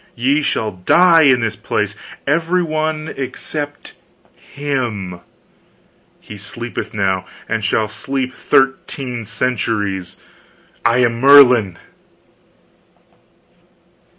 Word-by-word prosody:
Ye 135 +5 +1
shall 140 - 0
all 110 - -3
die 170 - +5
in 125 -2 +4
this 110 -1 -2
place 105 0 -2 0.3
every 165 +5 +1
one 155 -1 -2
except 145 +2 -6 0.4
him. 120 -11 -4 1.0
He 105 - -11
sleepeth 120 +4 -6
now 95 -3 -1 0.2
and 110 - -2
shall 110 +2 +1
sleep 130 +4 -4
thirteen 130 -3 0
centuries. 105 -5 -2 0.7
I 120 +2 +3
am 115 0 -2
Merlin!" 125 -9 +6
125 Hz, 95 wpm, -18 LUFS, 105-145 Hz, 1.0 s, Merlin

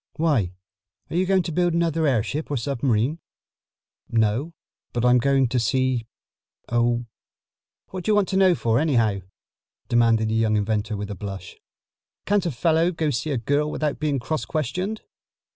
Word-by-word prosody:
"Why, 145 - +1 0.6
are - - -3
you 185 +1 +1
going 190 -1 +3
to 170 - -4
build 175 +1 +1
another 165 -2 +1
airship 135 +4 -1
or 145 - -1
submarine?" 130 +2 0 0.9
"No, 115 +7 +1 0.4
but 120 0 0
I'm 125 0 +5
going 135 +1 +3
to 125 +1 +1
see 125 +1 0 0.6
Oh, 120 0 +1 0.8
what 185 -2 -6
do - - -1
you 210 - +4
want 205 -2 +3
to 190 - 0
know 190 -2 +5
for, 115 -5 +1
anyhow?" 115 -10 +2 0.7
demanded 115 -2 +3
the - - -1
young 110 -1 +2
inventor 105 +1 -1
with 105 0 -5
a - - -4
blush. 95 -2 -7 0.7
"Can't 200 -3 +1
a - - -1
fellow 165 +5 +2
go 160 -3 -1
see 145 +4 -2
a 140 - 0
girl 145 +6 0
without 150 -2 -2
being 150 -2 0
cross 155 +5 -2
questioned?" 180 - -3
135 Hz, 165 wpm, -24 LUFS, 115-160 Hz, 0.9 s, I'm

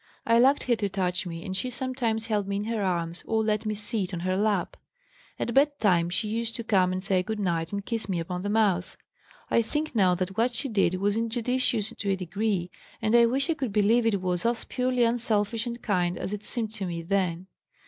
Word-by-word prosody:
I 230 0 +4
liked 270 +4 +4
her 245 - +2
to 205 -2 -1
touch 185 -1 -1
me 165 -1 -6
and 190 - -4
she 250 +7 -2
sometimes 245 -3 -1
held 210 -3 -1
me 200 - -2
in 200 - -1
her 225 0 -2
arms 170 -3 -2
or 220 -1 +1
let 215 0 0
me 215 - -1
sit 205 -3 -2
on 170 - -4
her 185 +1 0
lap. 200 -2 0 0.6
At 235 - -2
bedtime 220 - +3
she 185 +4 -1
used 230 +1 -2
to 235 - -4
come 190 -5 +3
and 185 0 -3
say 195 -2 +2
good 220 +3 -4
night 170 -4 -1
and 200 -1 -4
kiss 230 -4 -2
me 180 -3 0
upon 180 +2 -4
the 205 - -3
mouth. 205 -5 +1 0.5
I - - +4
think 300 +7 -2
now 190 -5 +4
that 185 +1 -3
what 240 +3 +1
she 270 +3 -2
did 195 -5 +2
was 200 +3 0
injudicious 230 -1 0
to 200 - -3
a 195 - +3
degree, 190 0 -2 0.3
and 220 0 0
I 235 0 +7
wish 270 +5 +1
I 330 - +2
could 270 -8 -3
believe 220 +3 +3
it 200 -4 +1
was 180 -1 0
as 235 0 0
purely 250 -1 0
unselfish 230 -1 0
and 235 0 -4
kind 180 -4 0
as 195 - -4
it 210 0 -5
seemed 225 -2 -2
to 195 -4 -3
me 170 -1 -4
then. 180 -1 0
210 Hz, 230 wpm, -27 LUFS, 185-230 Hz, 0.6 s, I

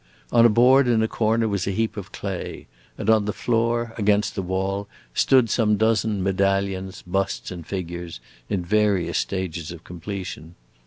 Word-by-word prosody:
On 120 0 +7
a - - +2
board 125 +4 +5
in 115 -2 +3
a - - +2
corner 115 +1 +1
was 100 -3 -1
a - - +1
heap 110 +3 -1
of 100 -1 -7
clay, 100 -3 -5 0.3
and - - -5
on 110 -2 +4
the 105 - 0
floor, 115 0 0
against 105 0 +2
the 95 - -2
wall, 95 +2 -2 0.3
stood 130 -3 +4
some 105 -2 +2
dozen 110 -2 +1
medallions, 95 0 0
busts, 95 +2 -2
and 85 -3 -8
figures, 85 -5 -5 0.3
in 90 -3 -1
various 105 -2 +2
stages 90 -4 -3
of 85 -1 -10
completion. 90 -2 -7
100 Hz, 165 wpm, -23 LUFS, 95-110 Hz, 0.3 s, On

